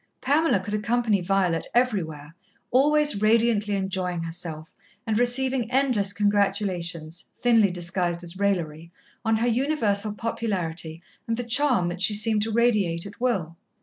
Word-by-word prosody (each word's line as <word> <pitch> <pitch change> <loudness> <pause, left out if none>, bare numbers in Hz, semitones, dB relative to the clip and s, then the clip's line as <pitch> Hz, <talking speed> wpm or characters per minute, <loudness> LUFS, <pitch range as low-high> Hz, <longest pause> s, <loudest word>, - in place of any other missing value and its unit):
Pamela 290 -3 +2
could 205 +3 -6
accompany 215 -1 +1
Violet 180 -2 0
everywhere, 165 - -1 0.4
always 295 -2 +3
radiantly 215 -2 +2
enjoying 185 -3 -2
herself, 165 -1 -6 0.3
and 220 -1 0
receiving 245 0 +1
endless 250 -7 +1
congratulations, 195 -5 0
thinly 230 -4 +4
disguised 175 0 -2
as 175 +2 -6
raillery, 170 -5 -2 0.3
on 225 -1 +2
her 230 +2 0
universal 225 -5 0
popularity 175 -8 -3 0.2
and 230 0 -1
the 245 - -2
charm 245 -5 +2
that 175 +1 -6
she 210 +2 +3
seemed 215 0 +1
to 220 +2 -2
radiate 210 -7 +1
at 205 +3 -11
will. 180 -10 -1
205 Hz, 135 wpm, -25 LUFS, 175-235 Hz, 0.4 s, thinly